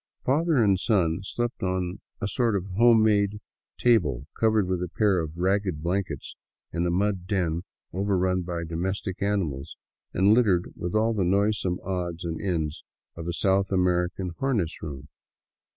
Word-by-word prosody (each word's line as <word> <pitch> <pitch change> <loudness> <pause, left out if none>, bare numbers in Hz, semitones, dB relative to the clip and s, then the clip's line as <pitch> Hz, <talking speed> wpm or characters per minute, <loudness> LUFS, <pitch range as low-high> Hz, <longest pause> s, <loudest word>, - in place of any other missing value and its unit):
Father 160 +5 +2
and 100 -3 +3
son 90 -7 +2
slept 120 +4 -3
on 95 0 -1 0.2
a 100 - -2
sort 115 +1 +1
of 95 -2 -1
home 115 0 +6
made 105 -1 +2 0.4
table 90 - +2
covered 110 -3 +3
with 90 -1 -1
a 90 - -3
pair 100 -1 +2
of 80 0 -4
ragged 95 -3 0
blankets 90 -4 -2 0.4
in 85 +1 0
a - - +1
mud 95 0 0
den 85 -4 0 0.3
overrun 95 -1 +1
by 85 -1 -4
domestic 95 +4 -3
animals 95 -10 -1 0.3
and 100 +3 +4
littered 100 -7 +2
with 90 +3 -4
all 110 +1 +3
the 100 -4 0
noisome 95 -1 +1
odds 90 -3 -3
and 80 -1 -3
ends 80 -6 -2 0.3
of 85 0 -7
a - - 0
South 95 +2 +1
American 90 0 +1
harness 110 -12 -1
room. 75 -2 -7
95 Hz, 155 wpm, -26 LUFS, 85-105 Hz, 0.4 s, home